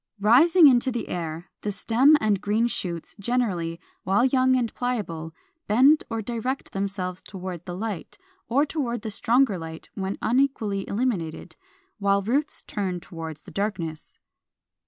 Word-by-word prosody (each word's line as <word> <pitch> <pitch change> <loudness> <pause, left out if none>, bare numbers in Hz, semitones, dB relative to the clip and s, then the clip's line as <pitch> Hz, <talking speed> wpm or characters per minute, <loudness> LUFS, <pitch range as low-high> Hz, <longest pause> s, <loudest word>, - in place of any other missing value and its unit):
466. 210 +3 +4
Rising 325 +5 +7
into 250 +1 +2
the 240 -1 -4
air, 165 -1 -4 0.2
the 210 - -2
stem 250 +9 +4
and 210 -3 +1
green 210 +3 +1
shoots 175 -8 -3
generally, 195 -8 -1 0.2
while 200 +6 +3
young 260 0 +3
and 240 -3 0
pliable, 195 -10 -3 0.4
bend 265 +9 +5
or 225 -1 -3
direct 240 +4 -3
themselves 195 -2 -3
toward 185 -3 -7
the 175 - -5
light, 210 -3 -5 0.3
or 275 +5 +3
toward 245 -7 -3
the 220 - -3
stronger 230 -1 +2
light 160 0 -8
when 195 0 -3
unequally 225 -5 0
illuminated; 200 -8 -2 0.4
while 200 0 +2
roots 280 +8 -1
turn 185 -3 -3
toward 165 -3 -7
the 185 - -11
darkness. 175 -4 -4
210 Hz, 145 wpm, -25 LUFS, 180-245 Hz, 0.4 s, Rising